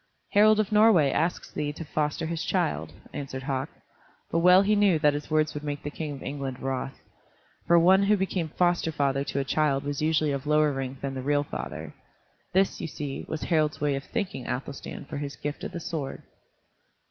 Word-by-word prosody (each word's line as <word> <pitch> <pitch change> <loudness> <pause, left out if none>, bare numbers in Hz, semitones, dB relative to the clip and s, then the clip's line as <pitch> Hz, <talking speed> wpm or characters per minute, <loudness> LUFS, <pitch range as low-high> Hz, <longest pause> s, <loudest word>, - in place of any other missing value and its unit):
"Harald 215 +1 +6
of 215 -1 0
Norway 210 -10 +5
asks 165 +5 -1
thee 145 -1 -2
to 165 - -7
foster 150 +1 -1
his 165 0 -3
child," 175 -5 -1 0.2
answered 130 -2 -5
Hauk. 135 0 -2 0.6
But 165 - +2
well 180 +3 +7
he 210 +1 +3
knew 200 -5 +4
that 150 -1 +3
his 145 0 -5
words 155 0 +2
would 150 - -6
make 145 -1 -4
the 145 - -4
King 150 -1 -4
of 135 - -9
England 135 -2 -4
wroth. 135 0 -3 0.7
For 170 0 +6
one 185 +3 +6
who 205 +1 +3
became 185 -3 -1
foster 175 0 +1
father 140 -2 0
to 140 - -4
a - - +1
child 140 0 +1
was 145 0 -3
usually 155 -1 +2
of 140 +1 -3
lower 150 0 +4
rank 135 -1 -5
than 140 -1 -3
the 130 - -4
real 145 +2 +1
father. 65 - -6 0.6
This, 190 +1 +2
you - - -3
see, 145 -3 -5
was 160 - -3
Harald's 155 -2 +1
way 145 -1 +1
of 135 0 -4
thanking 195 - -4
Athelstan 140 +2 -5
for - - -6
his 145 -1 -5
gift 145 0 -5
of - - -5
the 175 - -5
sword. 155 -5 -5
150 Hz, 205 wpm, -27 LUFS, 140-170 Hz, 0.7 s, well